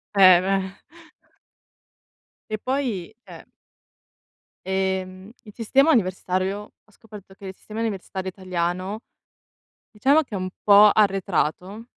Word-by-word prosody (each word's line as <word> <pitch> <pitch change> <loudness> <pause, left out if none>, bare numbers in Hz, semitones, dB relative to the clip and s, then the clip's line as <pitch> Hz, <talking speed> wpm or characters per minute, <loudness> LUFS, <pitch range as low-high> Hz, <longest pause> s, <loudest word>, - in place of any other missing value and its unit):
Eh 185 -3 +7
beh. 190 0 -2 1.7
Che 215 - -2
poi 230 -6 -3
cioè - - -13 1.2
ehm, 190 0 -3
il 210 - -14
sistema 270 +8 +2
universitario 190 - -1
ho 215 - -28
scoperto 205 -3 -14
che 195 0 -11
il 190 - -8
sistema 215 +1 -9
universitario 190 -3 -4
italiano, 185 +2 -4 0.9
diciamo 270 +8 +2
che 215 - -9
è - - -2
un 185 0 -4
po' 205 0 +7
arretrato, 195 0 -1
195 Hz, 110 wpm, -23 LUFS, 185-215 Hz, 1.7 s, Eh